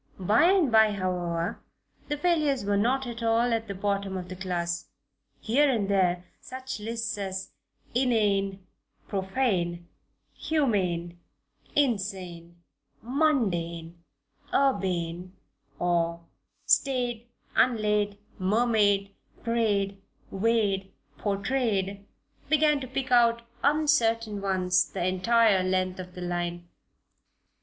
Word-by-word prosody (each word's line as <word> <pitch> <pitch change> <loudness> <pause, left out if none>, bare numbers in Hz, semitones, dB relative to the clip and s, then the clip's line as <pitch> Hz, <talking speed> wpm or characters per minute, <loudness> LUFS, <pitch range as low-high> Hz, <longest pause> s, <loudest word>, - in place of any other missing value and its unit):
By 210 - +3
and 360 -7 +4
by, 220 -1 +5
however, 175 -3 -2 0.5
the 295 - -2
failures 300 - +1
were 205 0 +1
not 250 +6 +1 0.2
all 230 +1 +2
at 225 0 -1
the 200 - -5
bottom 195 0 -2
of 180 -1 -7
the 185 - -6
class; 175 -2 -3 0.5
here 275 +6 +3
and 220 -6 0
there 180 -2 +2
such 260 -2 -7
lists 225 0 -3
as 190 -1 -4 0.4
"inane, 200 -6 +1 0.4
profane, 190 -4 -1 0.5
humane, 185 - -1 0.6
insane, 185 -9 -2 0.4
mundane, 175 - 0 0.5
urbane," 185 -8 0 0.4
or, 170 0 0 0.4
"staid, 245 -3 +1 0.3
unlaid, 210 -4 +2 0.2
mermaid, 205 -1 +2 0.3
prayed, 205 -4 0 0.3
weighed, 195 -2 +1 0.3
portrayed" 200 -2 -1 0.4
began 305 -1 +4
to 260 - -6
pick 260 0 -4
out 235 -1 +4 0.2
uncertain 230 -8 +2
ones 185 -2 +2
the 175 - -3
entire 195 +2 +3
length 185 0 0
of 180 0 -8
the 180 - -7
line. 175 0 -3
200 Hz, 100 wpm, -27 LUFS, 185-235 Hz, 0.6 s, by